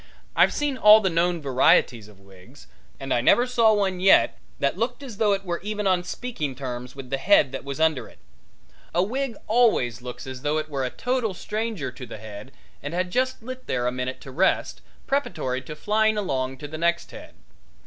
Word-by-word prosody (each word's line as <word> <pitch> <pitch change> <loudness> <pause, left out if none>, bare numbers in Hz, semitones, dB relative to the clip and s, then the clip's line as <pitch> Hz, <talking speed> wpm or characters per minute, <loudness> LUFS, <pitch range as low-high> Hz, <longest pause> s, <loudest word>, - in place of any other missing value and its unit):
I've - - +5
seen 290 -3 -1
all 210 +1 +9
the 190 -4 0
known 170 -1 0
varieties 125 -4 +3
of 105 -2 -18
wigs, 100 +7 -17 0.3
and 135 -1 -2
I 120 - +2
never 240 - +4
saw 235 -3 +3
one 195 -3 0
yet 190 +1 +4 0.2
that 140 - 0
looked 230 +7 -3
as 240 -7 -9
though 210 -2 +3
it 195 0 -3
were 175 -1 -2
even 210 +1 -3
on 185 -2 +2
speaking 175 - -4
terms 125 -1 -6
with 135 -2 -9
the 135 - -1
head 180 -8 +4
that 135 - -6
was 140 +1 -6
under 160 -4 +1
it. - - -18 0.8
A 175 - +4
wig 255 +3 -2
always 210 - +2
looks 125 0 -8
as 130 -1 -7
though 150 +2 0
it 155 0 -3
were 140 -3 -2
a 130 - -1
total 245 - -2
stranger 215 - -3
to 125 +1 -10
the 110 - -8
head 110 +3 -10 0.3
and 145 +4 -5
had 180 0 -1
just 255 0 -1
lit 255 +1 -8
there 125 -1 -1
a 125 - +1
minute 130 +1 -4
to 135 - -10
rest, 180 +9 0 0.2
preparatory 130 - -1
to 150 +4 -9
flying 215 +5 +1
along 135 -9 -2
to 145 - -7
the 155 +2 -7
next 170 +1 0
head. - - -12
165 Hz, 210 wpm, -24 LUFS, 130-215 Hz, 0.8 s, all